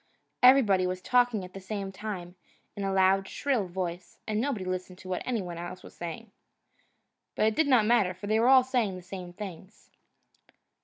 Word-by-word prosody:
Everybody 220 -8 +6
was 185 0 -3
talking 245 -2 +2
at 180 - -13
the 195 - -7
same 195 0 -5
time, 190 -3 -6 0.4
in 200 - -4
a 195 - 0
loud, 190 0 +3
shrill 255 -9 -1
voice, 180 -1 -5
and 215 -1 -1
nobody 235 -8 -2
listened 185 0 -4
to 185 - -13
what 185 -1 -2
anybody 185 -9 -3
else 180 +1 -7
was - - -12
saying. 175 +6 -7 1.0
But - - +2
it 220 0 +2
did 315 - +2
not 250 -6 +5
matter, 210 -6 +3
for 185 +3 -9
they 215 +2 +2
all 255 +2 +6
said 240 -7 0
the 180 - -11
same 180 -1 -8
things. 190 +1 -10
195 Hz, 185 wpm, -28 LUFS, 185-225 Hz, 1.0 s, Everybody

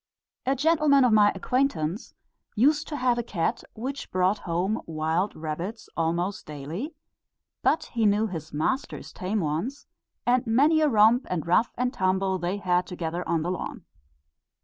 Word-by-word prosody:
A 270 - +3
gentleman 295 -2 +4
of 240 - +3
my 210 -1 +6
acquaintance 215 - -1 0.4
used 295 +7 +3
to 305 - -4
have 250 -3 +1
a - - +2
cat, 220 0 -2
which 265 +5 -5
brought 185 +3 +1
home 185 +6 0
wild 160 +5 -1
rabbits 165 +8 -5
almost 170 +4 -1
daily, 155 - -6 0.7
but 320 - +2
he 230 -2 +3
knew 205 +2 +3
his 165 -7 -6
master's 210 - -2
tame 200 +2 -2
ones, 165 - -3 0.4
and 245 0 +2
many 290 +8 +4
a 305 - +4
romp 225 +2 +4
and 180 -4 -2
rough 180 +7 +3
and 250 +1 0
tumble 190 -1 +1
they 175 +3 -2
had 180 -2 +1
together 175 0 -4
on 165 -2 +1
the 175 - -1
lawn. 185 - -5
205 Hz, 155 wpm, -26 LUFS, 175-250 Hz, 0.7 s, my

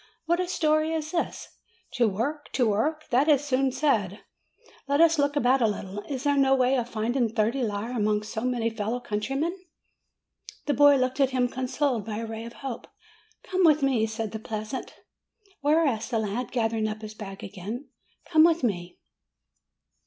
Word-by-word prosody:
"What 345 +2 +1
a 365 - 0
story 310 -2 +1
is 310 -1 -3
this! 340 - -2 0.4
To 240 -3 +2
work, 260 +9 -3
to 245 -3 +2
work! 305 +10 0
that 260 +5 +3
is 295 -3 +4
soon 270 -1 +1
said. 220 - 0 0.7
Let 285 +1 +1
us 330 -1 +5
look 285 0 +2
about 260 -1 +3
a 225 - +4
little. 205 -1 -4
Is 265 -2 -3
there 285 -1 +2
no 270 -1 +4
way 255 0 +3
of 240 -2 -1
finding 235 +2 0
thirty 225 +4 0
lire 215 0 -2
among 210 -1 +1
so 220 +1 -5
many 240 -2 0
fellow 225 +2 -2
countrymen?" 270 - -2 1.1
The 290 - +1
boy 285 +1 +6
looked 255 0 0
at 270 -2 +4
him 255 -1 +1
consoled 255 -1 -1
by 215 0 -5
a 230 - -3
ray 225 0 -6
of 235 - -9
hope. 250 -4 -5 0.6
"Come 375 0 0
with 305 -3 +5
me," 245 -5 +2
said 220 -1 -4
the 220 - -5
peasant. 215 +4 -5 0.6
"Where?" 305 +3 +3
asked 230 -5 -1
the 235 - 0
lad, 220 +3 -2
gathering 225 -2 0
up 215 0 -5
his 215 0 -7
bag 195 -2 -9
again. 210 +8 -6 0.4
"Come 315 -2 +5
with 335 -2 +3
me." 175 -6 -2
250 Hz, 180 wpm, -26 LUFS, 220-285 Hz, 1.1 s, boy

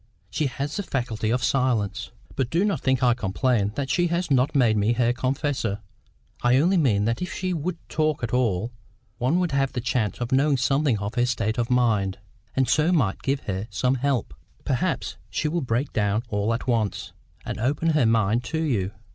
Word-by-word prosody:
She 155 - 0
has 140 +5 -4
the - - 0
faculty 120 - -2
of 125 +2 0
silence." 125 -7 0 0.3
"But 130 -3 -1
do 170 +7 +2
not 205 - 0
think 130 -1 +1
I 120 -1 +5
complain 105 0 0
that 140 -2 -2
she 175 -1 +2
has 170 -1 -1
not 130 +1 +2
made 120 -5 +4
me 105 +3 +2
her 120 0 +2
confessor. 130 -4 -1 0.6
I 120 +1 +4
only 175 +7 +3
mean 110 -10 +2
that 115 +6 -1
if 180 - -3
she 185 -1 -2
would 170 +2 -3
talk 155 -3 0
at 115 - -2
all, 115 -3 +1 0.5
one 130 +8 +2
would 180 -2 0
have 135 -1 0
a - - +2
chance 115 -3 -1
of 120 -1 -3
knowing 140 +2 +3
something 135 0 +2
of 100 0 -3
the 120 0 +1
state 110 -2 -1
of 120 - +1
her 125 - +1
mind, 105 -6 +1 0.4
and 130 -1 +2
so 150 +7 +3
might 130 - +1
give 135 +1 -1
her 95 +2 -4
some 125 +6 +1
help." 135 -3 -1 0.3
"Perhaps - - -1
she 150 - -1
will 170 +3 -1
break 125 +2 -1
down 105 +1 +1
all 105 +2 0
at 115 - -6
once, 115 -5 -1 0.3
and - - -4
open 145 +8 +1
her 150 -7 +3
mind 115 +1 +2
to 160 +4 -2
you. 110 -11 0
125 Hz, 205 wpm, -25 LUFS, 110-145 Hz, 0.6 s, I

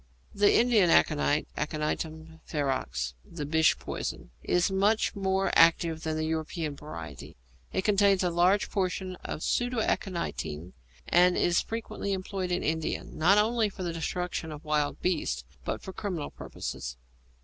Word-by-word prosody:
The 205 0 +4
Indian 230 -7 +5
aconite, 150 -2 +3
Aconitum 160 +1 -3
ferox, 65 - -1
the 155 -3 -6
Bish 160 +2 +3
poison, - - -5
is 180 +2 +1
much 205 +3 +2
more 195 -1 +1
active 165 -1 +4
than 160 -1 -2
the 155 - -1
European 160 -1 -2
variety. 80 - -9 0.3
It 190 - -1
contains 200 -2 +4
a 180 - +1
large 180 +4 +4
proportion 185 -1 -2
of 155 - -6
pseudaconitine, 175 - -1 0.3
and 180 +1 +5
is 175 0 +3
frequently 220 -3 -4
employed 185 -1 -3
in 180 - 0
India, 160 0 -1
not 180 +6 +3
only 220 +1 +3
for 190 -1 -7
the 170 -2 -2
destruction 170 0 -3
of 150 +1 -9
wild 150 -1 0
beasts, 150 - 0 0.2
but - - -3
for 190 - -7
criminal 180 -8 -4
purposes. - - -6
170 Hz, 140 wpm, -29 LUFS, 155-195 Hz, 0.3 s, Indian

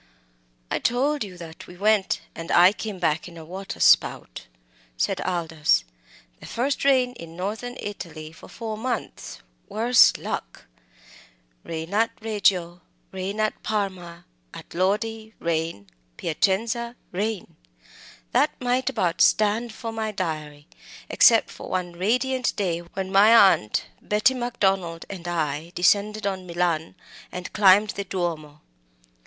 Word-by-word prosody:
"I - - 0
told 275 +4 +1
you 185 -3 -9
that 165 -2 -10
we 180 - -12
went 205 0 +2
and 165 0 -8
I 180 +2 +7
came 210 -2 -6
back 165 -2 0
in 170 -1 -12
a 160 - -10
water 190 +4 -7
spout," - - +3 0.5
said - - 0
Aldous; 160 - +1 0.6
"the - - -11
first 265 +4 -1
rain 260 -3 +3
in 165 0 -10
Northern 220 +7 -4
Italy 160 -6 -7
for 165 - -14
four 220 -2 -6
months 245 -1 -5 0.3
worse 235 +3 +5
luck! - - -6 1.0
'Rain 165 +3 -6
at 225 +2 +3
Reggio, 190 -6 0 0.3
rain 190 +3 -4
at 215 0 -1
Parma. 185 -5 -3 0.3
At - - -11
Lodi 220 +4 -1
rain, 165 -10 -2 0.3
Piacenza 230 +8 0 0.2
rain!' 205 +1 -3 0.8
that - - +2
might 250 +1 0
about 175 -10 0
stand 215 +3 +3
for 225 +1 -6
my 220 -1 -3
diary, 155 -6 -4 0.4
except - - +5
for - - -9
one 180 -1 -2
radiant 250 +8 0
day 175 -4 -1
when 190 +2 -6
my 205 +4 +7 0.2
aunt, 105 0 -2 0.2
Betty 215 +5 +2
Macdonald, 195 -9 -1
and 180 -3 -7
I 160 -1 -2
descended 210 +4 +2
on 190 -2 -3
Milan, 170 -1 -1 0.4
and 180 0 -7
climbed 205 +1 +5
the 200 - -4
Duomo." 165 -6 -4
190 Hz, 130 wpm, -24 LUFS, 170-220 Hz, 1.0 s, I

